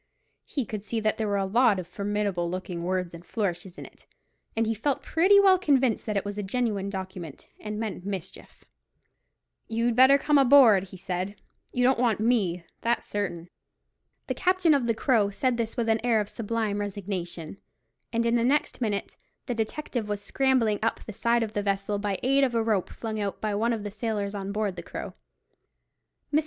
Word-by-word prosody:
He 270 -5 -3
could 210 -1 -5
see 225 +2 -2
that 215 0 0
there 220 - 0
were 200 -1 +1
a 195 - 0
lot 225 +1 +4
of 185 - -4
formidable 200 -1 -2
looking 180 -1 -4
words 180 -1 -1
and 170 0 -10
flourishes 185 -4 -3
in - - -8
it, - - -16 0.5
and 225 - +2
he 225 - 0
felt 260 +5 -1
pretty 375 +5 +5
well 380 -2 +6
convinced 265 - +2
that 210 -2 0
it 200 - -1
was 205 0 -4
a - - 0
genuine 205 -1 -1
document, 185 -6 -7
and 210 0 -5
meant 215 -5 -4
mischief. 190 -2 -7 1.0
"You'd 230 +1 0
better 260 +3 +7
come 295 0 +3
aboard," 245 -8 +7
he 190 0 -12
said; 185 +2 -3 0.4
"you 250 - 0
don't 255 0 +4
want 235 -4 +2
me; 200 -7 +1 0.2
that's 235 0 0
certain." 180 -4 -4 0.7
The - - -2
captain 365 -3 +3
of 270 -4 +1
the 230 - +1
Crow 220 -4 +2
said 245 +4 0
this 230 0 -3
with 235 -2 0
an 225 0 +1
air 235 -3 +3
of 210 -1 -2
sublime 220 -2 -2
resignation; 190 -4 -5 0.5
and 230 0 0
in 235 - +2
the 235 -1 +3
next 275 +1 +1
minute 205 -4 -2 0.3
the 245 - -2
detective 225 0 -3
was 205 -1 -1
scrambling 230 -1 +1
up 225 - 0
the 215 - -8
side 235 +3 +2
of 215 -1 -5
the 205 - 0
vessel, 200 0 -1
by 205 -1 -1
the 195 - -4
aid 275 +1 +4
of 250 -3 +1
a 230 - +2
rope 215 -5 0
flung 220 -2 -5
out 200 -1 -3
by 215 -1 -2
one 225 +4 +1
of 225 -3 -2
the 205 - -5
sailors 210 -1 -2
on 200 -1 -4
board 205 -3 -2
the - - -4
Crow. - - -7 1.2
Mr. 300 - +5
215 Hz, 200 wpm, -27 LUFS, 195-235 Hz, 1.2 s, better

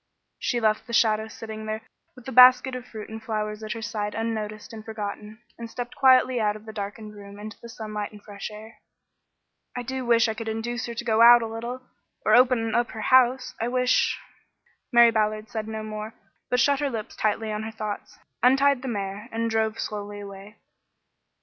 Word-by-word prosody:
She 240 - 0
left 215 0 +1
the 235 - -7
shadow 220 -2 +3
sitting 220 0 -8
there 215 +1 -4 0.3
with 250 -2 -15
the 265 - -5
basket 255 +1 +7
of 250 0 -6
fruit 215 -3 -8
and 220 0 -8
flowers 215 -1 -3
at 215 0 -4
her 225 -1 -7
side 210 -1 -3
unnoticed 215 -1 -4
and 220 -1 -8
forgotten, 215 0 -7 0.2
and 230 -1 -6
stepped 245 +1 -6
quietly 255 -1 +5
out 210 -1 +1
of 215 0 -12
the 220 - -9
darkened 210 +1 -6
room 200 -1 -11
into 215 +1 -9
the 235 - -10
sunlight 215 -2 -5
and 210 - -12
fresh 200 -1 -7
air. 215 +1 -12 1.0
"I 245 - -3
do 260 +1 -4
wish 235 -1 +4
I 220 - -1
could 225 +1 -7
induce 225 +2 -3
her 235 - -6
to 235 - -4
go 225 -1 +2
out 240 0 +9
a - - -3
little 235 +3 -6 0.4
or - - +4
open 245 -3 +4
up 240 +1 +1
her 220 - -6
house. 255 0 +4
I 230 - 0
wish 250 0 +2 0.4
" - - -40
Mary 235 -1 +7
Ballard 215 0 0
said 220 -1 -4
no 220 0 -5
more, 215 +1 -6 0.3
but 250 - +2
shut 280 +1 +3
her 290 -1 0
lips 225 -4 -6
tightly 215 +1 -1
on 210 0 -3
her 220 - -5
thoughts, 215 -2 -6 0.2
untied 270 +1 +4
the 265 - -6
mare, 205 0 -4
and 230 0 -1
drove 220 0 0
slowly 205 -1 -5
away. 200 +1 -10
220 Hz, 205 wpm, -25 LUFS, 215-240 Hz, 1.0 s, out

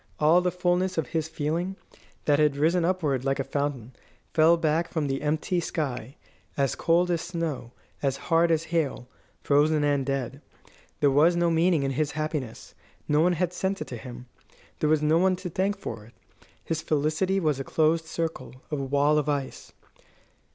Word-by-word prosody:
All 160 +4 +5
the 180 - +1
fulness 180 +1 0
of 155 -6 -1
his 160 -1 -1
feeling, 165 +5 -2 0.5
that 145 -1 +3
had 150 -2 +3
risen 165 +4 +2
upward 160 -8 0
like 135 0 0
a - - +1
fountain, 140 -4 -3 0.4
fell 165 +2 +5
back 165 +1 0
from 160 -3 -1
the 135 -1 -2
empty 155 +4 0
sky, 135 -7 -4 0.4
as 140 -2 +1
cold 175 +2 +2
as 170 -2 0
snow, 165 -8 -4 0.3
as 135 -1 0
hard 165 +2 +2
as 165 -1 +2
hail, 145 -6 -1 0.4
frozen 150 +1 +3
and 145 -2 +2
dead. 135 0 -3 0.6
There 145 -1 +4
was 155 +5 +4
no 170 -1 +2
meaning 165 -2 +2
in 135 - 0
his 145 +2 -1
happiness. 155 -6 -4 0.3
No 150 +1 +3
one 180 +2 +3
had 175 +1 -1
sent 190 +2 -2
it - - -5
to 125 - -5
him. 120 +1 -9 0.5
There 150 - +1
was 155 -1 +2
no 155 +2 +3
one 185 +1 +3
to 180 -1 -7
thank 195 +4 0
for 115 - -7
it. 115 - -19 0.5
His 160 -1 -2
felicity 155 +6 0
was 155 -6 0
a - - -2
closed 160 +3 +1
circle, 160 -4 -4 0.2
a 150 - -1
wall 140 +2 +2
of 150 - -2
ice. 140 -2 -3
155 Hz, 180 wpm, -26 LUFS, 140-170 Hz, 0.6 s, All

